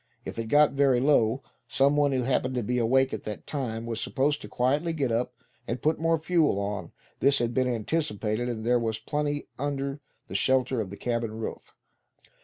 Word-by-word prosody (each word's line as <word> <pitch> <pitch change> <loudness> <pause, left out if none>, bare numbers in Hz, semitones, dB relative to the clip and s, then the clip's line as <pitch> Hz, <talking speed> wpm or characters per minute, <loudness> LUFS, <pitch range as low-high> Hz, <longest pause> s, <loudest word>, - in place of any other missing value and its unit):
If - - -6
it 115 - -2
got 145 +4 +5
very 135 -2 +3
low, 130 -2 +3 0.2
some 140 +1 +3
one 145 -1 +3
who 130 -2 +1
happened 130 0 0
to 125 - 0
be 125 +4 0
awake 130 +3 +3
at - - -3
the 105 -1 -5
time, 115 -6 -4
was 115 -1 -3
supposed 145 +2 0
to - - -8
quietly 145 +7 0
get 140 -6 0
up, 125 +2 -1 0.3
and 125 - -2
put 155 +1 +1
more 165 0 +2
fuel 160 - +2
on; 100 -3 -3 0.3
this 140 +1 +4
had 120 -2 0
been 130 0 +2
anticipated, 120 -2 -1
and 110 -2 -4
there 120 +1 +3
was 110 -2 -1
plenty 145 +4 -2
under 140 0 -2 0.3
the - - -9
shelter 130 -2 +2
of 100 - -5
the 100 - -8
cabin 115 -2 -2
roof. 115 - -6
130 Hz, 200 wpm, -27 LUFS, 115-145 Hz, 0.3 s, got